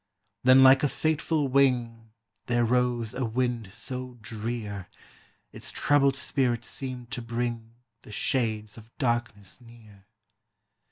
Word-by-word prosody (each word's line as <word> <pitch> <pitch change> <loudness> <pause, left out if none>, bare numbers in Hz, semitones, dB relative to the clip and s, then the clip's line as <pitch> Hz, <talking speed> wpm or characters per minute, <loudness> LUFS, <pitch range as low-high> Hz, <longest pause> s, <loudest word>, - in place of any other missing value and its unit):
Then 130 +1 +7
like 130 0 +7
a 145 - +3
fateful 155 -1 0
wing 120 -4 +1 0.4
There 120 -1 +2
rose 120 -2 0
a 130 - -2
wind 120 -3 -1
so 125 +2 -6
drear, 105 -3 -5 0.6
Its - - -4
troubled 140 -2 +2
spirit 125 -4 0
seemed 125 -3 -5
to 130 -2 -3
bring 115 -1 -4 0.3
The - - -13
shades 110 -2 -1
of 110 +1 -16
darkness 120 - -2
near. 110 -4 -17
120 Hz, 120 wpm, -27 LUFS, 115-130 Hz, 0.6 s, Then